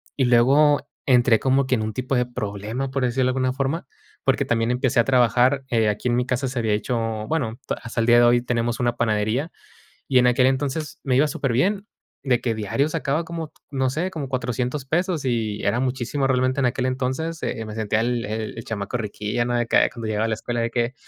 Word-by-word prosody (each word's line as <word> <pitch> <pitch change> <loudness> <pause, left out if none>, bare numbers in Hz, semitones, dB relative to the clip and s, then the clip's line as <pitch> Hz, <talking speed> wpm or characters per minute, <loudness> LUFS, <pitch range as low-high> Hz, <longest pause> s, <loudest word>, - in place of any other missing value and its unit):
y 135 - +1
luego 135 +5 +5 0.3
entré 120 -3 +5
como 135 0 +2
que 130 - +2
en 110 - -2
un 110 0 -3
tipo 130 +1 -2
de 125 - +2
problema, 110 +3 -4
por 135 -1 -2
decirlo 125 +1 +1
de 130 - +2
alguna 130 0 0
forma, 135 +3 -2 0.4
porque - - +2
también 115 +1 0
empecé 125 -1 +1
a 115 - +6
trabajar. 130 +1 +3
Eh, 115 -2 +2
aquí 105 +4 -1
en 120 - +2
mi 125 - +1
casa 130 +1 -1
se 130 0 -5
había 110 -2 +1
hecho, 115 +3 -1 0.3
bueno, 130 -7 -2
ta - - -1
hasta 115 0 -4
el 115 - 0
día 120 0 +6
de 120 - +6
hoy 120 0 +5
tenemos 120 0 -1
una 120 0 +1
panadería, 110 +6 0 0.6
y 130 - +3
en 125 - +4
aquel 125 +1 +4
entonces 140 +3 -2
me 130 -3 +1
iba 150 - +4
superbién, 175 - 0 0.4
de 125 -4 +2
que 115 - 0
diario 110 +7 0
sacaba 155 0 -1
como, 165 -2 -6 0.2
no 130 -2 0
sé, 165 +8 -2
como 145 -7 -5
400 125 +2 -2
pesos, 170 0 -1
y 110 -4 -1
era 120 - +1
muchísimo 130 +2 -1
realmente 130 +1 +1
en 130 - +2
aquel 125 +1 -1
entonces. 130 +6 -2
Eh, 110 -1 -3
me 105 - -7
sentía 110 -1 0
el 120 +1 0
el 110 +1 -4
el 115 - -6
chamaco 110 +1 -4
riquíllo, 105 +1 -2
¿no?, 120 - -1
de 120 - +1
que, - - 0
ay, - - +5
cuando 115 -3 -7
llegaba 110 0 0
a - - 0
la 110 - 0
escuela, 120 +1 -3
de 115 - 0
que: 120 +1 -1
125 Hz, 230 wpm, -23 LUFS, 115-135 Hz, 0.6 s, a